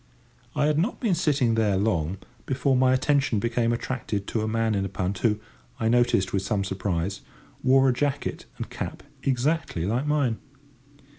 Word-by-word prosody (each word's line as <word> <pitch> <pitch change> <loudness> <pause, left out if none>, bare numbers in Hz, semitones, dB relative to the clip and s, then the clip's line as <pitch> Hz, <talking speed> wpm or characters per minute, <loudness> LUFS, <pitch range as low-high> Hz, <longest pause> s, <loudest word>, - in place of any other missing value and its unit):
I 150 0 +2
had 150 0 +2
not 200 +9 0
been 225 -7 +1
sitting 145 -8 +2
there 105 -3 +2
long 95 -4 0 0.3
before 135 0 +1
my 130 0 +4
attention 135 -2 +2
became 115 +2 +1
attracted 115 -4 -3
to 110 - -1
a 110 - -1
man 115 0 +1
in 100 -2 0
a 95 - -3
punt 95 0 -2
who, 105 -3 +2 0.4
I 110 - +1
noticed 120 -6 +2
with 95 - +1
some 100 +1 0
surprise, 95 -1 -2 0.4
wore 135 +1 +5
a 130 - +4
jacket 140 +2 -2
and - - -4
cap - - -6 0.2
exactly 135 - 0
like 120 +8 0
mine. 140 -7 +1
115 Hz, 170 wpm, -26 LUFS, 100-135 Hz, 0.4 s, wore